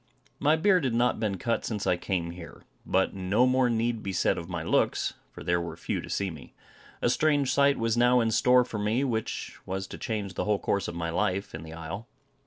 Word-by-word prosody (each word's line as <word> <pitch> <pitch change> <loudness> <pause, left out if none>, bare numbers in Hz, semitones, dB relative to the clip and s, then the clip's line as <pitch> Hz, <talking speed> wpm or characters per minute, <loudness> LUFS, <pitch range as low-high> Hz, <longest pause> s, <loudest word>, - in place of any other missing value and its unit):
My 150 +2 +4
beard 180 +1 +3
had 125 -4 0
not 120 0 +2
been 105 -3 -1
cut 115 +6 -1
since 105 -3 -3
I 90 - +3
came 85 -1 -2
here. 85 -1 -11 0.2
But 95 0 +2
no 100 +6 +2
more 130 -1 +3
need 115 0 0
be 100 - -3
said 90 - +2
of 85 +1 -8
my 85 -2 -3
looks, 85 - +1 0.2
for - - -10
there 85 0 +1
were 85 - -6
few - - -3
to - - -10
see 100 -2 -1
me. 80 -4 -12 0.5
A - - +4
strange 145 -2 +2
sight 140 0 +4
was 115 0 +1
now 120 +1 +4
in 115 -1 +1
store 125 +2 +5
for 110 - -5
me, 110 +6 +1
which 115 -5 -3
was 95 +1 -4
to - - -9
change 105 -4 -3
the - - -2
whole 105 -1 +2
course 100 0 -1
of 85 - -5
my 85 -1 -2
life 95 +3 -1
in 80 - -6
the 80 0 -9
isle. 85 +7 -7
105 Hz, 230 wpm, -28 LUFS, 90-125 Hz, 0.5 s, store